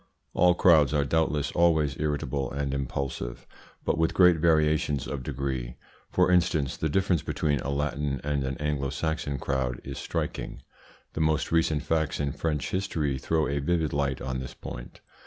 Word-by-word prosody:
All 90 -1 +4
crowds 75 -5 +5
are 70 -1 +2
doubtless 75 -1 +1
always 80 -5 +3
irritable 70 -3 -1
and 70 0 -2
impulsive, 70 -3 -4 0.4
but 80 - +1
with 80 - +1
great 90 -3 +6
variations 75 -3 +2
of 70 - -4
degree. 65 -2 -3 0.3
For - - +3
instance, 80 -6 +2
the 80 - -1
difference 90 -1 +2
between 75 -3 0
a 65 - -4
Latin 70 -1 -1
and 70 -1 0
an 65 0 -3
Anglo 75 -2 -1
Saxon 80 -3 -2
crowd 65 -3 -1
is - - -6
striking. - - -4 0.5
The 80 - -2
most 80 -1 +1
recent 80 -2 +2
facts 80 0 0
in 70 -1 0
French 75 -2 -2
history 80 -8 -1
throw 80 +3 +1
a 70 0 -1
vivid 80 +1 0
light 70 -2 0
on 65 -1 -2
this 65 - -7
point. - - -9
75 Hz, 165 wpm, -27 LUFS, 70-80 Hz, 0.5 s, great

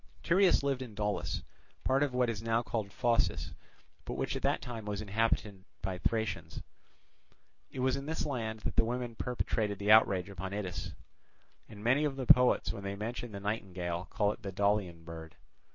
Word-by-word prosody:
Tereus 180 -2 +4
lived 135 -2 0
in 120 -5 -7
Daulis, 105 -1 -1 0.4
part 135 +1 +2
of 145 -2 +2
what 125 -1 +2
is 110 -3 -2
now 115 +1 +1
called 110 -4 -3
Phocis, 120 0 +1 0.5
but - - -5
which - - -1
at - - -3
that - - +2
time 115 -3 -6
was 105 -1 -3
inhabited 105 -2 0 0.2
by 95 -1 -2
Thracians. 110 +1 -2 1.1
It 130 - -5
was 130 0 +2
in 140 +1 -5
this 160 0 -1
land 110 -6 -3
that - - -3
the - - +6
women 120 +1 -2
perpetrated 110 -3 -1
the 100 +2 +2
outrage 100 -4 +6
upon 95 0 -5
Itys; 95 -6 -4 0.7
and 105 -2 -10
many 130 +6 +4
of 145 -3 0
the 135 -1 -3
poets 125 -3 +6
when - - -7
they 100 0 -3
mention 115 +3 -4
the 100 - -6
nightingale 95 -4 -3
call 105 -1 +2
it 120 - -8
the 100 -4 -5
Daulian 100 -4 0
bird. 80 -1 -8
110 Hz, 185 wpm, -32 LUFS, 100-125 Hz, 1.1 s, the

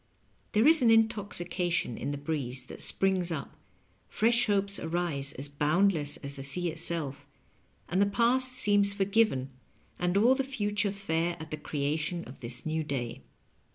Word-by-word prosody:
There 220 +5 +4
is 320 -2 +5
an 240 - +5
intoxication 195 - +1
in - - -4
the 145 - -3
breeze 135 -4 -4
that - - -8
springs 190 -2 0
up, 155 -4 -5 0.5
fresh 235 +2 +2
hopes 200 -1 +1
arise 160 -5 -2
as 135 +3 -3
boundless 150 +2 +1
as 140 0 -7
the - - -6
sea 170 +6 -2
itself, 160 -4 -4 0.6
and 185 +3 +1
the 200 - +4
past 255 +4 +3
seems 205 -1 +4
forgiven 195 - +1 0.5
and 180 +2 +1
all 235 +6 +5
tbe 270 0 -2
future 210 -5 -1
fair 175 -3 -2
at 160 -1 -9
the 155 - -3
creation 155 +3 -2
of 130 - -12
this 120 0 -3
new 160 0 -1
day. 130 -3 -4
175 Hz, 155 wpm, -29 LUFS, 145-205 Hz, 0.6 s, is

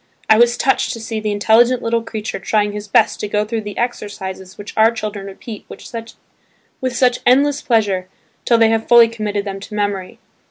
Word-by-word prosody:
I 220 0 +5
was 240 0 +4
touched 265 - +1
to 230 - -7
see 225 0 -4
the 215 -1 -2
intelligent 230 +4 +3
little 230 0 0
creature 220 -2 -5
trying 210 +2 0
his 210 0 -7
best - - +2
to 210 - -3
go 210 +1 0
through 225 +1 -3
the 205 -1 -8
exercises 190 -5 -5
which 205 - -9
our 220 +1 +5
children 210 -3 -5
repeat 205 +2 -9
with - - -10 1.2
such 250 0 +2
endless 280 +3 +3
pleasure 200 -6 0 0.3
till 235 - +3
they 225 -1 +5
have 225 0 0
fully 235 -1 +7
committed 210 -3 -3
them 195 -1 -5
to 210 +2 -9
memory. 205 -3 -2
215 Hz, 190 wpm, -18 LUFS, 205-230 Hz, 1.2 s, fully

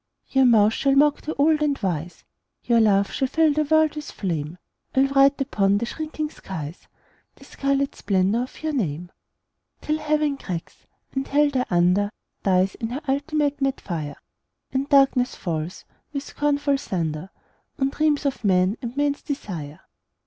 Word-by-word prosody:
Your 265 -1 +4
mouth 220 -3 +5
shall 275 +2 +2
mock 290 +1 +4
the 310 - -4
old 305 +2 +3
and 290 -2 +1
wise, 175 -4 -3 0.4
Your 235 -1 +3
laugh 200 -3 +3
shall 265 - 0
fill 315 +2 +3
the 305 +1 +1
world 315 0 +3
with 300 -1 -6
flame, 165 -3 -3 0.4
I'll 265 +1 +5
write 275 +1 +4
upon 200 -7 +2
the 230 - -1
shrinking 310 +3 -4
skies 165 - -8 0.5
The - - -16
scarlet 275 0 -1
splendour 195 +3 +1
of 255 +5 -8
your 310 -1 -1
name, 175 - -2 0.7
Till 305 0 -1
Heaven 300 -2 0
cracks, 175 -9 -7 0.2
and 270 0 -3
Hell 290 +1 +3
thereunder 200 -6 +2 0.3
Dies 190 0 +2
in 225 - -5
her 260 +5 -4
ultimate 290 +1 0
mad 270 -1 0
fire, 155 -5 -5 0.6
And 270 +2 -1
darkness 270 -3 +4
falls, 165 -1 -4 0.3
with 280 -1 -3
scornful 285 -1 0
thunder, 165 - -3 0.5
On 270 -2 +1
dreams 300 0 +1
of 275 -3 -2
men 185 +1 +2
and 240 +1 -6
men's 290 0 0
desire. 175 - -6
265 Hz, 155 wpm, -24 LUFS, 190-290 Hz, 0.7 s, mouth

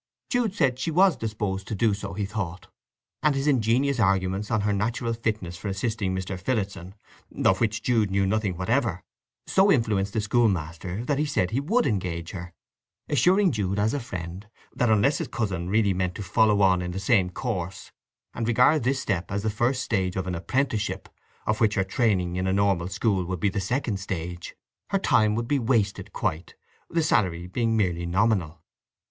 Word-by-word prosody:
Jude 235 -5 +1
said 130 -5 +1
she 165 - -1
was 180 +1 +4
disposed 105 -4 -3
to 110 - -3
do 110 +1 +2
so, 100 -1 -5
he 100 0 -1
thought, 95 -4 -5 0.6
and 150 -2 +3
his 135 +1 -1
ingenious 130 0 +2
arguments 95 0 +1
on 110 -3 +1
her 105 0 +1
natural 115 +3 -1
fitness 110 -7 -3
for 100 - -6
assisting 100 -1 -1
Mr. 95 0 -4
Phillotson, 95 -3 -3 0.5
of 95 - +4
which 110 -1 0
Jude 115 -5 +2
knew 95 0 +1
nothing 100 -2 0
whatever, 110 -2 0 0.4
so 195 +1 +4
influenced 105 - +1
the 110 - 0
schoolmaster 95 -2 0
that 145 0 0
he 150 - +2
said 100 -10 0
he 120 - +1
would 215 - +1
engage 90 -7 -2
her, 90 -2 -7 0.6
assuring 180 - +4
Jude 100 -5 -1
as 105 +2 +1
a 145 - 0
friend 95 -4 -7 0.3
that 120 - +1
unless 110 +7 +3
his - - -3
cousin 95 -7 -3
really 105 -1 +3
meant 90 -1 -1
to 105 - -5
follow 105 +2 +3
on 95 -2 +4
in 90 - -3
the 95 - -3
same 95 -2 +2
course, 95 -3 -4 0.4
and 115 - -3
regarded 125 +6 +4
this 135 +2 +1
step 95 -8 -2
as 100 0 -2
the 110 - 0
first 120 +4 0
stage 95 -4 -1
of 95 - -2
an 90 - -3
apprenticeship, 110 +5 -1 0.4
of 110 +1 -1
which 110 -2 +3
her 95 - +2
training 95 -4 0
in 95 0 -1
a 95 - +1
normal 100 -3 +1
school 95 -1 0
would 90 0 -4
be 100 - +2
the 100 +1 -2
second 115 0 -1
stage, 90 -2 -5 0.3
her 195 - +2
time 110 - +3
would 115 +1 -2
be 145 +1 +1
wasted 110 -4 0
quite, 80 +3 -3 0.3
the 165 -1 +1
salary 90 - +1
being 115 +4 0
merely 85 -4 0
nominal. 90 -4 0
105 Hz, 190 wpm, -26 LUFS, 95-120 Hz, 0.6 s, was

